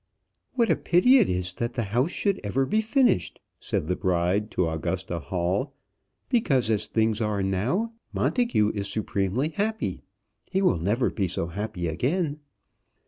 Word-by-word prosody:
"What 235 -3 +2
a - - +4
pity 250 +10 +5
it - - +3
is 90 -1 -1
that 120 +5 -3
the 120 - -1
house 125 +7 +2
should 200 +1 -1
ever 130 +7 0
be 215 +9 +1
finished!" 230 - +2 0.2
said 75 - -2
the 90 - 0
bride 90 +4 0
to 90 - 0
Augusta 85 +2 -3
Hall; 90 - -2 0.5
"because 135 - +2
as 105 -1 0
things 110 0 +1
are 105 -2 0
now, 125 - 0 0.2
Montagu 235 - +1
is 100 -1 -3
supremely 105 +6 -1
happy: 210 - -2 0.5
he 190 +1 0
will 90 - +3
never 105 +9 +1
be 100 -3 -1
so 85 - -2
happy 95 0 -4
again." 145 - -1
110 Hz, 155 wpm, -26 LUFS, -, 0.5 s, pity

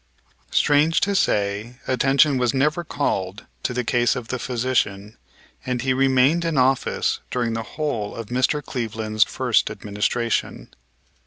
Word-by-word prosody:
Strange 150 +3 +3
to 200 - 0
say, 105 - 0
attention 135 +2 +3
was 125 -1 +1
never 150 +6 +1
called 100 - -2 0.2
to - - -2
the 125 0 -2
case 120 +1 +2
of 125 -3 -6
the 130 - -3
physician 115 -5 -1 0.5
and 125 -2 -2
he 130 -1 +2
remained 135 +5 +3
in 165 -3 -1
office 130 +1 +1
during 120 -2 -1
the 115 - -2 0.2
whole 120 -10 -2
of 115 - -6
Mr. 130 +4 0
Cleveland's 110 -3 0
first - - 0
administration. 105 +3 -2
125 Hz, 140 wpm, -22 LUFS, 115-135 Hz, 0.5 s, Strange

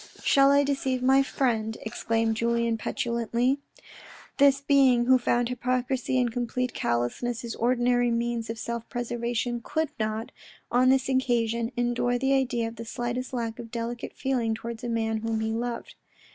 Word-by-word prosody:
"Shall 275 0 +5
I 285 0 +5
deceive 270 -2 -1
my 265 +1 +5
friend," 225 -5 -1
exclaimed 225 0 0
Julien 235 0 +1
petulantly. 235 +4 -1 0.8
This 280 -1 +6
being 270 -4 +4
who 260 +1 +5
found 240 0 +1
hypocrisy 255 +1 -1
and 245 -2 +1
complete 250 +1 -2
callousness 120 - -1
his 235 -1 -4
ordinary 245 0 +2
means 235 -1 -1
of 225 - -4
self 235 +1 -5
preservation 240 0 -2
could 315 +4 -1
not, 220 +1 -2 0.4
on 250 +1 +4
this 265 0 +3
occasion, 235 -3 +1
endure 245 0 +1
the 270 +2 +1
idea 250 -4 +1
of 225 0 -9
the 230 - -5
slightest 240 +2 -3
lack 230 -3 -3
of 230 - -7
delicate 235 0 -4
feeling 240 -4 0
towards 230 +1 -7
a 240 - -3
man 225 -1 0
whom 225 0 -2
he 220 0 -1
loved. 235 +1 -4
240 Hz, 160 wpm, -27 LUFS, 230-255 Hz, 0.8 s, This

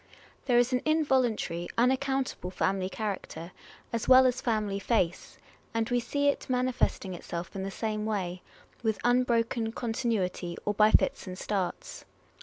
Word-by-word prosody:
There 245 -2 +4
is 245 +2 +3
an 250 - +2
involuntary, 260 - +1
unaccountable 260 -4 +1
family 190 0 0
character, 190 -5 -5 0.4
as 230 - -2
well 260 0 +8
as 255 0 +1
family 210 -4 0
face; 185 -5 -1 0.4
and 225 -1 +1
we 245 - +3
see 285 +4 0
it 285 - -3
manifesting 250 -6 0
itself 170 0 -6
in 195 - -3
the 195 - -3
same 215 +1 -3
way, 185 -4 -2 0.4
with 220 -3 0
unbroken 235 -2 +2
con 235 -2 -3
tinuity, 190 -7 -1
or 210 - +1
by 210 +1 +5
fits 220 - +2
and 185 0 -6
starts. 195 -2 -3
225 Hz, 150 wpm, -29 LUFS, 190-250 Hz, 0.4 s, well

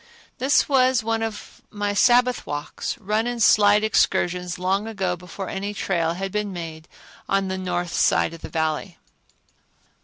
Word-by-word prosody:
This 270 +3 +3
was 255 -3 +3
one 225 0 -1
of 225 -2 -6
my 205 -1 -2
Sabbath 245 +4 +3
walk, 145 0 -6 0.2
run 215 +4 -1
and 245 0 -2
slide 210 -1 +5
excursions 180 -4 +1
long 190 +4 0
ago 190 -5 -2
before 180 +2 -8
any 200 +2 -4
trail 170 -4 -1
had 195 +1 -4
been 210 0 -2
made 160 -3 -7 0.4
on 195 -1 +1
the 190 - -2
north 175 -1 -3
side - - +2
of 165 - -11
the - - -7
Valley. 160 -2 -2
195 Hz, 155 wpm, -23 LUFS, 175-220 Hz, 0.4 s, slide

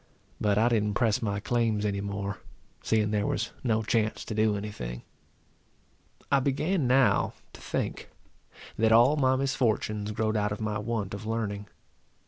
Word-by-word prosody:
But 105 -1 +2
I 115 +3 +4
didn't 105 -3 +1
press 110 -2 +2
my 100 -3 -1
claims 110 -1 0
any 100 -1 -1
more, 100 0 -4 0.4
seeing 105 -2 +1
there 105 -1 0
was 110 - -1
no 110 -3 +1
chance 110 0 0
to - - -4
do 110 -1 +2
any 105 +1 -5
thing. - - -6 1.3
I 140 - +5
began 145 +4 0
now 130 +1 +3 0.2
to - - -13
think, - - -3 0.7
that 110 0 +4
all 120 +6 +6
my 130 -3 +3
misfortunes 110 -6 0
growed 110 +1 -1
out 105 -1 +1
of 100 - -4
my 110 -1 -2
want 105 -3 -3
of 100 +2 -6
learning. 105 -3 -3
110 Hz, 160 wpm, -28 LUFS, 105-120 Hz, 1.3 s, all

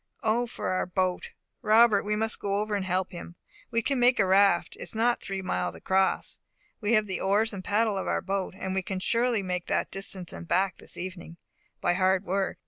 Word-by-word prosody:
Oh, 235 +2 +1
for 235 - -4
our 185 0 0
boat! 185 0 -1 0.3
Robert, 220 -1 +5
we 210 +1 -1
must 220 +1 0
go 200 -1 -1
over 210 +1 -1
and 200 -2 -1
help 185 0 -1
him. 170 -1 -9 0.3
We 230 -1 0
can 275 +1 0
make 245 +1 +5
a 195 - +5
raft. 190 -2 +3
It - - -14
is - - -6
not 235 +2 +2
three 195 0 -4
miles 185 - -2
across. 190 0 0 0.4
We 215 +1 0
have 215 -2 +4
the 190 -2 -4
oars 210 +3 +2
and 190 -2 -6
paddle 210 0 +1
of - - -4
our - - 0
boat, 195 -1 -2
and 190 -1 -3
we 190 - 0
can 190 0 -4
surely 230 +1 +1
make 180 -1 -3
that - - -1
distance 195 -2 -5
and 170 - -8
back 185 +1 +1
this - - -7
evening, 175 -2 -7 0.4
by - - +2
hard 190 +1 +2
work. 195 +1 -1
195 Hz, 220 wpm, -27 LUFS, 185-215 Hz, 0.4 s, Robert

